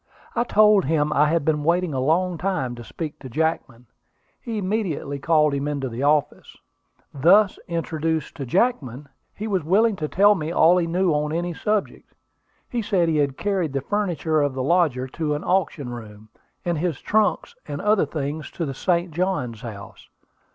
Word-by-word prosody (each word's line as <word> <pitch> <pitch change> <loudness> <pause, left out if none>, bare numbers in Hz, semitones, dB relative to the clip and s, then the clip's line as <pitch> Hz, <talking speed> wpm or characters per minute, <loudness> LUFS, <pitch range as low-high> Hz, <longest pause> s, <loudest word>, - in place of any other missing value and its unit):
I 235 - +1
told 210 -3 +5
him 150 0 +1
I 150 +1 +4
had 165 -1 0
been 150 -2 +1
waiting 170 0 +1
a 130 - -1
long 170 +5 +1
time 180 -10 -1
to 120 0 -9
speak 155 +5 -7
to 130 - -9
Jackman. 135 -4 -2 0.6
He 230 -3 -4
immediately 185 -8 -2
called 150 -1 +3
him 140 +1 -2
into 140 -3 -2
the 120 +2 -6
office. 145 0 0 0.6
"Thus 185 +8 +4
introduced 160 -1 -2
to 140 - -4
Jackman, 140 - 0 0.3
he 215 - -5
was 190 -6 0
willing 205 +7 +3
to 155 - -2
tell 205 +6 +5
me 160 -4 -3
all 170 +1 +5
he 170 -2 +1
knew 180 +1 +1
on 150 0 0
any 175 +2 -2
subject. 210 +4 -3 0.5
He 240 - -2
said 185 -5 +1
he 155 - +1
had 140 -2 0
carried 190 -8 -1
the 135 - -1
furniture 170 -3 0
of 145 -2 0
the 130 - -2
lodger 145 -5 +2
to 150 +1 -2
an 145 - -5
auction 170 -8 0
room, 110 -3 -10 0.4
and 170 -3 0
his 170 -3 -2
trunks 215 - 0
and - - -5
other 210 -6 +2
things 150 +1 -4
to 170 - -3
the 135 - -4
St. 175 +4 0
Johns 150 - -2
House. 110 -4 -10
160 Hz, 180 wpm, -23 LUFS, 140-185 Hz, 0.6 s, told